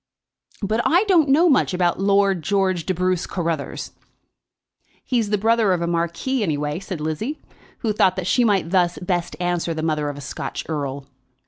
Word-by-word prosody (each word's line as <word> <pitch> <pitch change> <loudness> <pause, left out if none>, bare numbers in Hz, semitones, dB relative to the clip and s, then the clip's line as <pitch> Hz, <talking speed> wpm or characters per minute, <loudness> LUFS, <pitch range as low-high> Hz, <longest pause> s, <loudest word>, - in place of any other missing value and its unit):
"But 215 +4 +1
I 350 +5 +4
don't 350 -9 +3
know 315 +6 +5
much 270 - +3
about 175 -1 +1
Lord 195 -2 +2
George 190 -2 0
de 185 - +1
Bruce 185 0 0
Carruthers." 165 -5 -3 1.1
"He's 235 -5 0
the 210 - +2
brother 225 -1 +3
of 170 -1 -1
a - - 0
marquis, 170 +10 -1
anyway," 150 -4 -1
said 185 -3 -6
Lizzie, 160 - -3 0.4
who 220 -3 0
thought 190 -3 +3
that 185 -2 -3
she 245 +6 +3
might 195 -7 +1
thus 180 -2 +2
best 175 -1 -2
answer 175 -2 -1
the 155 - -3
mother 155 -2 0
of 145 - -6
a - - -8
Scotch 135 - -5
Earl. 140 -3 -4
185 Hz, 180 wpm, -22 LUFS, 165-210 Hz, 1.1 s, know